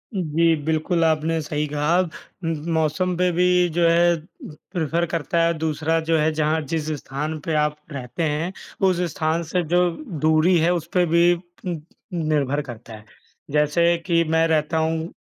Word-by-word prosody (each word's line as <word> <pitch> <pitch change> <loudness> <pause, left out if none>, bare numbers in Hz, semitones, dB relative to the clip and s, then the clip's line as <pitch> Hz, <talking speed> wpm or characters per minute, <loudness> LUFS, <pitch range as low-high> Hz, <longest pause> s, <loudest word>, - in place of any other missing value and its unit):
उम, 190 - 0
जी, 165 0 +4
बिल्कुल 160 +2 +1
आपने 160 0 +1
सही 150 0 -2
कहा। 150 +3 +1
उम, 170 -1 -4 0.2
मौसम 160 +3 0
पे 180 0 +2
भी 175 +1 +2 0.3
जो 170 -1 +4
है 170 +1 +4 0.4
प्रिफ़र 170 +1 -2
करता 165 +1 0
है, 170 0 +2
दूसरा 160 +1 0
जो 165 - +4
है 155 +1 +2
जहाँ 155 +1 +1
जिस 155 -2 -1
स्थान 150 +4 -4
पे 165 - -1
आप 150 0 -1 0.2
रहते 130 +2 -4
हैं 160 +3 -1 0.4
उस 180 -1 0
स्थान 160 +1 0
से 175 +2 -1
जो 180 0 +4 0.3
दूरी 160 +4 +4
है 165 +2 +3
उस 170 -2 -3
पे 180 -2 +3
भी 170 +1 +4
पूम्प 175 -2 -8 0.3
निर्भर 150 -4 0
करता 120 -4 -10
है। 105 -1 -11 0.5
जैसे 150 +4 +3
कि 170 -2 +3
मैं 160 0 +2
रहता 160 0 +1
हूँ, 160 0 0
160 Hz, 170 wpm, -22 LUFS, 155-170 Hz, 0.5 s, जी